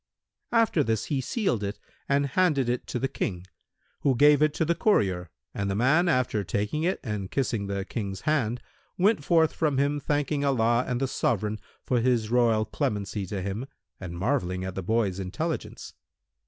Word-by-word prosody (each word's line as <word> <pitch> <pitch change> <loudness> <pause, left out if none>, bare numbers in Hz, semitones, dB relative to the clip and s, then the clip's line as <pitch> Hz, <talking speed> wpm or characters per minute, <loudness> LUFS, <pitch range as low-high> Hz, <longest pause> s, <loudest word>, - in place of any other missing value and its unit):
After 225 -9 +3
this 110 -4 -1
he 135 - +1
sealed 130 - -1
it 100 +1 -3 0.3
and 140 0 +3
handed 140 -2 +2
it 125 0 -2
to - - -3
the 135 - 0
King, 90 -9 -4 0.5
who 135 -2 +2
gave 145 +3 +6
it 155 0 +4
to 160 - +1
the 170 - +2
courier, 95 - +1 0.2
and 100 0 -2
the 95 - -1
man, 150 - +3
after 125 -7 +1
taking 105 - -2
it 180 +4 0
and 105 -6 -4
kissing 115 -7 -1
the 100 -1 -3
King's 100 -5 -4
hands 125 -6 0 0.4
went 195 -3 +3
forth 160 0 +3
from 150 -4 0
him 145 +1 +1
thanking 145 0 -1
Allah 120 -3 +2
and 125 -1 -1
the 135 - 0
Sovran 110 -4 -1 0.2
for 125 - +1
his 115 -3 +1
royal 115 -3 +3
clemency 100 -2 -2
to 95 0 -4
him 100 +7 -4 0.3
and 85 -3 -7
marvelling 95 -4 -1
at 95 - -4
the 95 - -4
boy's 100 -1 0
intelligence. 155 - -4
120 Hz, 180 wpm, -27 LUFS, 100-145 Hz, 0.5 s, gave